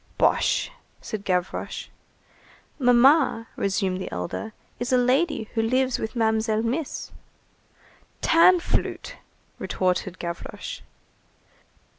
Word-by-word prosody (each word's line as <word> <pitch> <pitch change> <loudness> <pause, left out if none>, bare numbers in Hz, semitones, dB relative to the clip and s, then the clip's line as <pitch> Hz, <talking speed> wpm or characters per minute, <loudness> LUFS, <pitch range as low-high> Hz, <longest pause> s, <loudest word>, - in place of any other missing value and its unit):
"Bosh," - - +2 0.3
said 215 -3 -6
Gavroche. 180 -2 -2 0.9
"Mamma," 250 -1 +4
resumed 190 -2 -1
the - - -6
elder, 90 - -4 0.3
"is 245 +1 -2
a 255 - +5
lady 260 +3 +2
who 225 - +1
lives 255 +3 +1
with 220 +3 -4
Mamselle 220 -1 +1
Miss." 265 +6 -3 1.1
"Tanflûte!" 355 +8 +3 0.5
retorted 185 0 -1
Gavroche. 170 -1 -6
230 Hz, 90 wpm, -25 LUFS, 195-260 Hz, 1.1 s, a